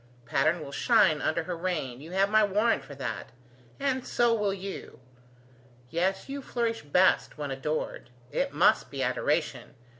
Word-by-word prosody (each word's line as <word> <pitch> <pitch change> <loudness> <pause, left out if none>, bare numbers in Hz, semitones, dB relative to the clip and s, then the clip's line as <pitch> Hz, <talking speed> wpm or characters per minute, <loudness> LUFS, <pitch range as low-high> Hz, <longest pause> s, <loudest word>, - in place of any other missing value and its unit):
Patterne 155 +7 +1
will 140 - -8
shine 160 - +3
under 160 +3 0
her 180 +1 -4
reign; 160 -8 -3
you 160 - -10
have 190 +2 +2
my 215 +1 +4
warrant 210 +3 +2
for 140 - -10
that. 125 -6 -5 0.5
And 265 -2 0
so 240 -1 +2
will 210 -3 +1
you. 195 0 -7 0.9
Yes, 190 +3 0
you 280 +1 -5
flourish 235 -3 -2
best 180 +5 +2
when 145 -2 -4
adored. 145 +2 -3 0.2
It - - 0
must - - +3
be - - -3
adoration. - - -1
185 Hz, 155 wpm, -28 LUFS, 150-215 Hz, 0.9 s, my